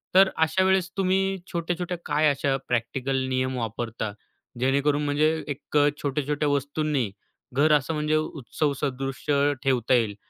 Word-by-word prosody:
तर 190 0 +7
अशा 160 +4 +2
वेळेस 190 -1 +2
तुम्ही 195 0 +1
छोट्या-छोट्या 175 +1 -2
काय 150 +1 +2
अशा 140 -1 +1
प्रॅक्टिकल 125 +3 -1
नियम 130 0 0
वापरता, 115 -1 -3 0.5
जेणेकरून 140 +3 +2
म्हणजे 145 +1 +2 0.2
एक 145 +1 -7 0.3
छोट्या-छोट्या 145 +1 -1
वस्तूंनी 145 -3 0 0.4
घर 145 +4 +3
असं 145 +3 -4
म्हणजे 150 0 0
उत्सव 150 -1 -2
सदृश्य 140 +1 0
ठेवता 130 -2 +2
येईल. 115 -5 +2
145 Hz, 130 wpm, -25 LUFS, 130-155 Hz, 0.5 s, तर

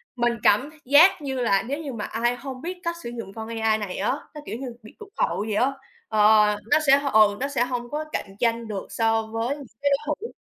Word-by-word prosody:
mình 240 -1 +1
cảm 260 +9 +3
th - - -19
giác 305 +6 +6
như 265 -3 -3
là 200 -5 +2
nếu 280 +6 -4
như 285 -5 -6
mà 210 -2 -4
ai 240 +2 0
hông 260 0 -8
biết 360 +3 -5
cách 340 0 -2
sử 235 - -5
dụng 230 -5 -7
con 220 0 -7
AI 220 -1 +2
này 205 -4 -5
á, 200 - 0 0.2
nó, 300 - -8
kiểu - - -5
như, 270 - -5 0.2
bị 215 - -14
tụt 420 -1 -11
hậu - - 0
vậy 215 - -2
á, 260 +5 +2 0.4
ờ, 215 0 +5 0.2
nó - - +7
sẽ, 275 +1 +7
ừ, 210 -1 +5
nó 275 - -1
sẽ 275 -4 0
hông 245 -1 -4
có 305 +1 -3
cạnh 195 -1 -4
tranh 230 -1 0
được 200 -3 -5
so 225 -1 +1
với 225 +5 -2
những 280 - -10 0.2
cái 285 0 +2
đối 280 - +4 0.2
thủ. 460 - -4
240 Hz, 255 wpm, -24 LUFS, 220-280 Hz, 0.4 s, nó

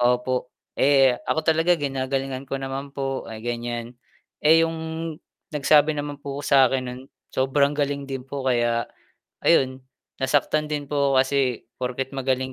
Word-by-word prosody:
opo. 125 +1 +1 0.3
Eh, 135 -2 +5 0.2
ako 160 - +2
talaga 165 +2 +4
ginagalingan 135 -2 -2
ko 135 - -2
naman 135 +1 -5
po, 135 -1 -2
ah, 110 - -7
ganiyan. 120 0 -4 0.5
Eh, 160 +2 +7
yung 165 0 -4 0.8
nagsabi 150 +1 +4
naman 145 0 -4
po 140 0 -5
sa'kin 135 -2 +4
nun, 125 +1 -7 0.3
sobrang 140 +2 +2
galing 140 -1 -1
din 135 -2 -4
po, 135 0 -5
kaya 120 -2 +1 0.6
ayun, 130 0 +3 0.4
nasaktan 145 +3 +2
din 145 -1 -2
po 140 -1 +2
ako 130 - +6
kasi, 130 -3 -1
porket 130 +1 -3
magaling 130 0 -1
135 Hz, 145 wpm, -24 LUFS, 130-145 Hz, 0.8 s, Eh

